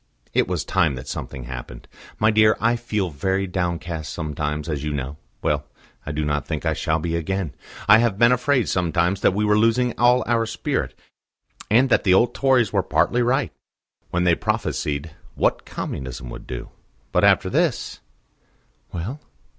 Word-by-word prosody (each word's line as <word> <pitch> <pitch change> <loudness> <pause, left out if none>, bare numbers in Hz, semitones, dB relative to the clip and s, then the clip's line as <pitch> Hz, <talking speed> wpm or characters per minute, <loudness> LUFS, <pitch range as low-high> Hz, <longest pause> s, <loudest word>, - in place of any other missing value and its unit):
It - - +2
was 85 -5 -2
time 85 -8 +2
that 65 +2 -8
something 65 0 -6
happened. - - -8 0.3
My 110 +1 +3
dear, 110 0 +4
I 115 +2 +2
feel 110 -6 -2
very 95 +7 -1
downcast 85 -3 -3
sometimes, 75 -1 -3
as 75 -3 -3
you 75 - -2
know. 70 +1 -4 0.3
Well, 75 0 0 0.4
I - - -2
do 75 0 -2
not 75 -2 -1
think - - -3
I - - +2
shall 80 - 0
be 85 +1 -2
again. 85 0 -2 0.3
I 110 - +8
have 115 -4 +1
been 120 +3 +5
afraid 125 -1 +2
sometimes 90 +1 +1
that 95 - +3
we 105 +1 +1
were 105 0 +3
losing 115 +2 +2
all 125 +1 +5
our 115 -1 +1
spirit, 115 0 -2 0.7
and 125 +5 +4
that - - +3
the 95 -2 +5
old 120 +4 +3
Tories 130 -6 +2
were 100 - +3
partly 120 +6 +1
right 125 +1 +1 0.6
when 90 +1 0
they 90 -1 +4
prophesied 75 -7 -2 0.2
what - - 0
Communism 65 -2 -5
would - - -9
do. 65 0 -6 0.4
But - - +2
after - - +5
this - - 0 0.4
" - - -40
"Well?" 100 - -5
90 Hz, 175 wpm, -23 LUFS, 75-115 Hz, 0.7 s, I